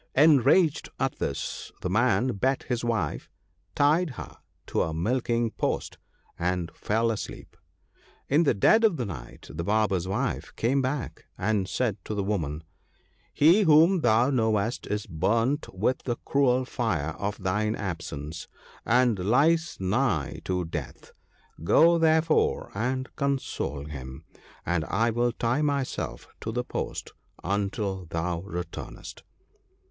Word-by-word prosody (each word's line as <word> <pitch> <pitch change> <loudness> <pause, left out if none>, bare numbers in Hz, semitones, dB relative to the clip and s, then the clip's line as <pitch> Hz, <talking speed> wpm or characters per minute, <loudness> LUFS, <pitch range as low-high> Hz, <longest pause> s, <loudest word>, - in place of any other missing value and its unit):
Enraged 150 +3 +4
at - - -1
this, - - -4
the 90 - -2
man 120 +4 +3
beat 130 +4 0
his 120 -2 -2
wife, 110 -10 -2 0.5
tied 155 +5 +3
her - - -8 0.3
to - - -2
the 80 - 0
milking 115 +4 0
post, - - -2 0.4
and 90 -1 -1
fell 115 +2 0
asleep. 110 - -7 0.7
In 145 +4 +4
the 145 -8 +3
dead 220 - +5
of 210 -7 +4
the 125 - -2
night 65 -12 -9
the 85 +2 -3
Barber's 100 -2 +1
wife 120 +7 -2
came 135 +4 +1
back, 130 0 -3
and 100 -1 0
said 115 -6 0
to 110 - -4
the 100 - -1
woman, 80 -7 -2 0.4
' - - -39 0.3
He 170 +8 +6
whom 165 +1 +6
thou 120 +2 +3
knowest 110 -2 0
is 105 -1 -2
burnt 115 - 0
with 105 +7 0
the 120 - -2
cruel 130 -2 +2
fire 90 - -1
of 100 0 -2
thine 105 +4 0
absence, 80 -4 -5 0.4
and 120 -3 +3
lies 150 - +2
nigh 95 - 0
to 90 -1 -1
death; 75 -6 -7 0.5
go 165 - +5
therefore 160 0 +2
and 130 +5 -2
console 135 - -2
him, 65 -3 -8 0.4
and 85 -1 0
I 115 +7 +1
will 120 +1 +1
tie 120 +4 0
myself 140 -3 -2
to 110 - -4
the 125 +2 -1
post - - -5 0.3
until 100 -1 -2
thou 85 +1 -2
returnest. 90 -2 -7
115 Hz, 135 wpm, -27 LUFS, 95-130 Hz, 0.7 s, He